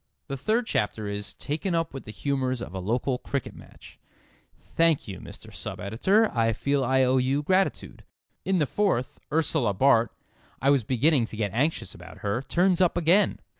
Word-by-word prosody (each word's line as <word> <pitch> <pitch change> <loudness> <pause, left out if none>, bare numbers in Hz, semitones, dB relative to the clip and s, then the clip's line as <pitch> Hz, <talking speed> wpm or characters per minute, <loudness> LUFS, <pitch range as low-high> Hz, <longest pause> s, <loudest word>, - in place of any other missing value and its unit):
The 135 - -2
third 220 - 0
chapter 105 - -1
is 100 0 -4
"taken 165 +5 -2
up 165 -2 -1
with 135 - -7
the 110 - -7
humours 130 +1 -1
of 120 - -7
a 95 - -4
local 125 +6 -1
cricket 140 -4 -4
match." - - -15 0.6
Thank 165 -3 +1
you, 95 -3 -7
Mr. - - -12
Sub - - -5
editor. 190 - +2
I 115 -1 +2
feel 140 +4 0
I 130 +1 +3
owe 130 +1 +3
you 135 +3 +1
gratitude. 190 +4 0 0.4
In 190 -1 +1
the 155 - +2
fourth, 160 -7 -1
Ursula 150 -9 +1
Bart 120 0 +4 0.5
(I 135 +2 +3
was 140 -4 +3
beginning 130 +1 +2
to 110 - -9
get 105 -3 -2
anxious 130 - 0
about 90 0 -13
her) 105 +4 0
turns 175 +7 +2
up 175 -1 +3
again. 175 +5 +3
135 Hz, 180 wpm, -26 LUFS, 115-165 Hz, 0.6 s, Bart